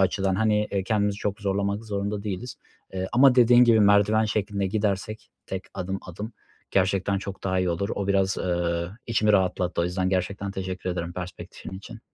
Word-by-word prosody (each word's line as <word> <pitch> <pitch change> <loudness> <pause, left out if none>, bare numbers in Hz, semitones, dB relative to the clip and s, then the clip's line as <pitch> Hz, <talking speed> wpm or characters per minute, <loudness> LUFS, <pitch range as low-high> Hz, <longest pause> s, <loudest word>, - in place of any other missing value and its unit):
açıdan. 95 0 +1
Hani, 105 0 +2
eee, 100 -2 -2
kendimizi 105 -2 0
çok 105 +1 -3
zorlamak 100 +2 -1
zorunda 100 -1 -3
değiliz. 105 +4 -5 0.4
Eee, 95 0 -2
ama 130 +1 +6
dediğin 120 0 +7
gibi 115 -2 +5
merdiven 105 +2 +4
şeklinde 105 -2 -1
gidersek 105 +1 -2 0.2
tek - - -4
adım, 95 +2 -3
adım 105 +6 -7 0.4
gerçekten 95 0 +1
çok 100 0 -8
daha 95 -1 +1
iyi 90 -1 +1
olur. 90 +4 -2
O 100 - -3
biraz, 95 -1 +2
eee, 85 -1 -1 0.2
içimi 110 -2 +2
rahatlattı. 90 -2 +1
O - - +1
yüzden 90 +1 -1
gerçekten 100 +1 -1
teşekkür 95 -1 -4
ederim 85 -1 -3
perspektifin 90 0 -8
için. 110 +3 -11
100 Hz, 175 wpm, -25 LUFS, 95-105 Hz, 0.4 s, dediğin